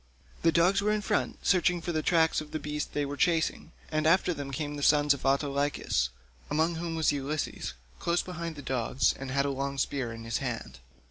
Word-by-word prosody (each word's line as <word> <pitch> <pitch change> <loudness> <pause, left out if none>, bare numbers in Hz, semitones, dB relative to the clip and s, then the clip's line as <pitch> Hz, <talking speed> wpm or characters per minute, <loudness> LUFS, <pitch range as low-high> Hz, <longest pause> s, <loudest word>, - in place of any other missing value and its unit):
The 165 - +4
dogs 175 +4 +4
were 210 +1 +2
in 215 0 +1
front - - -1
searching 180 -1 +3
for 175 - -3
the 155 -2 0
tracks 160 -1 +3
of 155 - -9
the 155 - -3
beast 150 0 -4
they 145 -1 0
were 140 +1 -4
chasing, 165 -2 +1 0.2
and 155 0 +1
after 180 +1 +4
them 140 -3 -5
came 145 +2 -3
the 145 - -5
sons 145 0 +5
of 140 -1 -4
Autolycus, 140 - +1 0.4
among 160 +3 +2
whom 165 0 -3
was 160 -1 +3
Ulysses, 145 - -3 0.3
close 170 +1 +1
behind 170 -3 -5
the 145 - -9
dogs, 125 0 +1
and 135 -1 -5
he 130 - -3
had 140 0 +3
a 140 - 0
long 140 +1 -3
spear 135 -3 -1
in 115 0 -8
his 115 0 -2
hand. 115 - -5
150 Hz, 215 wpm, -29 LUFS, 140-165 Hz, 0.4 s, sons